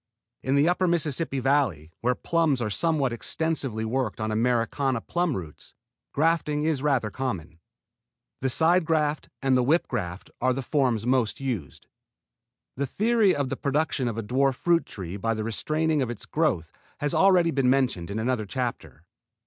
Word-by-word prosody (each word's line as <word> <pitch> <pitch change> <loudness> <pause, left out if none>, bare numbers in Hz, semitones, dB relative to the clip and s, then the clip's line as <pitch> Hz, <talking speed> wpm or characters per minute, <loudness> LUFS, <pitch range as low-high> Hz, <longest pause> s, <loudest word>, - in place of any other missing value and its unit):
In 135 +2 0
the 145 +3 +4
upper 180 +1 +2
Mississippi 160 -4 0
Valley, 125 - +1
where 125 +1 +1
plums 160 -4 +1
are 110 -3 -2
somewhat 145 -1 +1
extensively 135 -4 -1
worked 120 -2 -2
on 110 0 -2
Americana 120 +3 +1
plum 175 +4 -1
roots, 80 -5 -9 0.4
grafting 150 -1 +1
is 155 -4 0
rather 135 -7 +1
common. 90 -12 -4 0.8
The 130 - 0
side 165 +7 +3
graft 155 -2 0
and 135 -1 +3
the 125 - +4
whip 155 +8 +2
graft 90 -1 -4
are 130 +1 +3
the 135 +1 -4
forms 125 -6 +1
most 125 -3 +1
used. 110 - -4 0.9
The 140 +1 -2
theory 215 - +2
of 140 -2 -1
the - - -2
production 140 -2 0
of 115 -2 -3
a 115 - -2
dwarf 130 +4 +1
fruit 170 +4 +1
tree 95 -1 -6
by 115 +3 -1
the 110 - -3
restraining 155 +7 0
of 125 - -1
its 120 -3 -6
growth 115 - 0 0.3
has 145 0 -1
already 180 -3 +4
been 135 -3 +2
mentioned 125 -10 +1
in 100 - -3
another 110 -1 -1
chapter. 120 - -4
130 Hz, 165 wpm, -26 LUFS, 115-155 Hz, 0.9 s, the